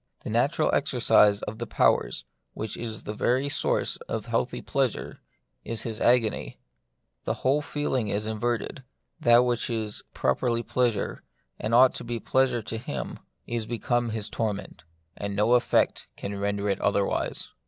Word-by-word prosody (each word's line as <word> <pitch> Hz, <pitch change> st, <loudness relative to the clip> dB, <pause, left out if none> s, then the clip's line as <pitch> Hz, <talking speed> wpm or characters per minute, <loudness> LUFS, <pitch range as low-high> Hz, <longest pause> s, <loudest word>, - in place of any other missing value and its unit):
The -, -, -5 dB
natural -, -, +2 dB
exer -, -, 0 dB
cise 105 Hz, -1 st, +5 dB
of 110 Hz, +1 st, -5 dB
the -, -, -4 dB
powers, -, -, +2 dB, 0.3 s
which 110 Hz, -1 st, -4 dB
is 110 Hz, -2 st, -6 dB
the 105 Hz, -, -4 dB
very 130 Hz, +5 st, +1 dB
source -, -, +1 dB
of -, -, -3 dB
healthy -, -, -1 dB
pleasure, -, -, -2 dB, 0.4 s
is 115 Hz, -1 st, -4 dB
his 115 Hz, -2 st, -5 dB
agony. 120 Hz, -3 st, +2 dB, 0.7 s
His -, -, -2 dB
whole 140 Hz, +3 st, +2 dB
feeling 145 Hz, -6 st, -1 dB
is 105 Hz, +1 st, -1 dB
inverted; 115 Hz, +4 st, -2 dB, 0.4 s
that 120 Hz, 0 st, +6 dB
which 120 Hz, 0 st, 0 dB
is 110 Hz, -3 st, -2 dB
properly 115 Hz, -, +1 dB
pleasure, 120 Hz, -5 st, 0 dB, 0.4 s
and 110 Hz, +2 st, 0 dB
ought 130 Hz, +1 st, +7 dB
to -, -, -6 dB
be 120 Hz, 0 st, -3 dB
pleasure 130 Hz, -1 st, +1 dB
to 110 Hz, +1 st, -4 dB
him, 70 Hz, -, -5 dB, 0.3 s
is 115 Hz, -2 st, -3 dB
become 120 Hz, 0 st, 0 dB
his 110 Hz, -2 st, -3 dB
torment, 105 Hz, -7 st, -4 dB, 0.3 s
and 100 Hz, -1 st, -4 dB
no 105 Hz, +4 st, +3 dB
effort 125 Hz, -, +2 dB
can 100 Hz, 0 st, -4 dB
ren 100 Hz, 0 st, 0 dB
der 100 Hz, 0 st, -2 dB
it 100 Hz, -, -1 dB
otherwise. 100 Hz, -1 st, 0 dB
115 Hz, 160 wpm, -27 LUFS, 105-120 Hz, 0.7 s, ought